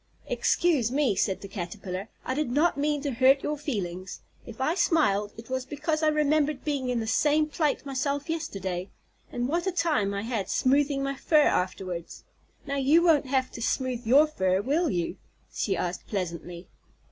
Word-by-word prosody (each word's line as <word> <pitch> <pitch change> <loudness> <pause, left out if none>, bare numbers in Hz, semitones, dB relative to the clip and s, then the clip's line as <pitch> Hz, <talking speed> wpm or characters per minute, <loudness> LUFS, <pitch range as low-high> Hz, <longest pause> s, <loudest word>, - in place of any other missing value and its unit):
"Excuse 290 -10 +1
me," 270 -6 +2
said 190 0 0
the 200 - -7
Caterpillar, 190 +1 -6 0.2
"I 260 - -1
did 295 -1 -1
not 300 +7 +2
mean 290 0 0
to 285 - -1
hurt 265 +3 +4
your 300 - -1
feelings. 195 - -5 0.3
If - - -10
I 265 +5 +1
smiled, 300 - +2
it 225 0 -10
was 260 0 -2
because 305 +3 -2
I 310 - +3
remembered 300 -1 +1
being 280 -4 -1
in 245 -1 0
the 225 - -2
same 295 +7 +3
plight 300 -1 -1
myself 280 +1 -2
yesterday, 195 - -3 0.4
and 245 0 -2
what 340 +6 -1
a - - +2
time 325 - +1
I 200 - -3
had 225 -4 -3
smoothing 275 +1 +2
my 275 0 -1
fur 305 +3 +2
afterwards. 180 - -2 0.4
Now, 280 0 -2
you 290 +5 +4
won't 315 -6 +4
have 260 -1 0
to 235 - -8
smooth 250 -1 -1
your 280 +6 +7
fur, 190 -11 0
will 305 +7 +1
you?" 175 -6 -2 0.4
she 195 -4 -1
asked 175 +1 -3
pleasantly. 175 -2 -5
265 Hz, 180 wpm, -27 LUFS, 200-300 Hz, 0.4 s, your